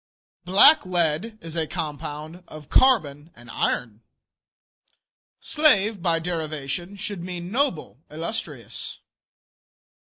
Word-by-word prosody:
Blacklead 185 - +4
is 165 0 -9
a 160 -2 0
compound 155 0 -6
of 155 -2 -12
carbon 160 - +3
and 120 -1 -13
iron. 110 -2 -2 1.4
Slave 220 - +2
by 170 -1 +2
derivation 165 +1 -4
should 200 -1 -6
mean 180 0 -6
noble, 235 - -1
illustrious. 165 +8 -5
170 Hz, 90 wpm, -24 LUFS, 150-195 Hz, 1.4 s, Blacklead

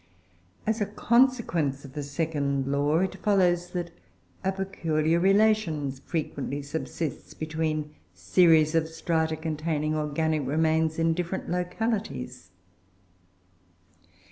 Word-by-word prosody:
As 220 0 0
a 205 - +1
consequence 210 - +2
of 135 - -11
the 150 - -4
second 140 -2 -1
law, 145 +3 +1
it 190 - -1
follows 180 -4 +2
that 175 -2 -3 0.5
a 190 - +1
peculiar 165 -4 0
relation 195 -7 +3
frequently 145 0 -4
subsists 160 +1 -5
between 155 -1 -2 0.2
series 155 - +4
of 165 -1 +2
strata 160 0 -1
containing 155 -1 -2
organic 155 0 0
remains, 160 +2 +1
in 165 0 +2
different 175 +1 -3
localities. 180 - -3
160 Hz, 105 wpm, -27 LUFS, 150-180 Hz, 0.5 s, series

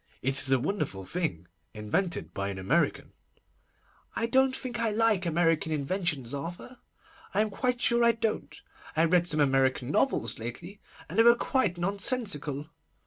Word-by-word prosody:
'It 135 - +1
is 135 - -1
a 135 - +5
wonderful 125 - -3
thing, 95 - -3 0.3
invented 105 - -2
by 100 0 -3
an 100 - -5
American.' 95 0 0 1.0
'I 230 - 0
don't 265 +2 +3
think 245 -3 -5
I 230 -1 +2
like 215 -4 +2
American 165 -1 +1
inventions, 150 -4 -2
Arthur. 175 - -7 0.6
I 205 - +4
am 215 -1 -1
quite 250 +4 -1
sure 235 0 +3
I 235 0 +5
don't. 225 -1 -3 0.4
I 165 - +5
read 175 +1 +3
some 155 -3 -1
American 135 -2 +2
novels 270 - 0
lately, 165 - -8 0.3
and 180 +8 -3
they - - +8
were 235 0 +7
quite 235 -7 0
nonsensical. 175 - 0
175 Hz, 155 wpm, -28 LUFS, 135-225 Hz, 1.0 s, they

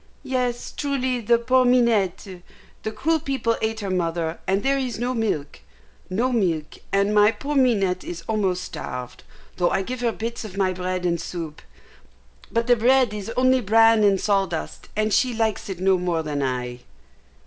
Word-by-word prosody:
"Yes, 250 -2 -2
truly, 260 -3 -1
the 235 +2 +4
poor 255 +2 +3
Minette! 210 -7 +1 0.4
The 220 - -3
cruel 315 +9 0
people 265 -5 -1
ate 220 0 -1
her 195 -2 -3
mother, 170 -2 -1
and 195 +1 +1
there 275 0 +2
is 255 -3 -3
no 245 +2 -1
milk 210 - -2 0.5
no 235 +8 0
milk, 170 -10 -1
and 200 +1 +2
my 210 +1 +6
poor 290 +5 -5
Minette 200 -9 +2
is 170 -1 -7
almost 190 -4 0
starved, 125 -6 -7 0.3
though 175 -1 +2
I 195 - 0
give 250 +4 -5
her 235 -1 +1
bits 230 +1 -5
of 200 -3 -9
my 190 -2 +1
bread 185 0 -3
and 170 -1 0
soup; 165 -3 -6 0.9
but 230 0 +1
the 245 0 +5
bread 245 0 +3
is 210 0 -5
only 255 0 +4
bran 225 +1 +5
and 200 -2 +4
sawdust, 195 -5 -1
and 215 0 0
she 250 -2 +2
likes 220 -2 -1
it 185 -2 -5
no 190 0 +3
more 175 -2 -1
than 145 -2 -3
I." 125 -2 -2
210 Hz, 175 wpm, -23 LUFS, 180-245 Hz, 0.9 s, my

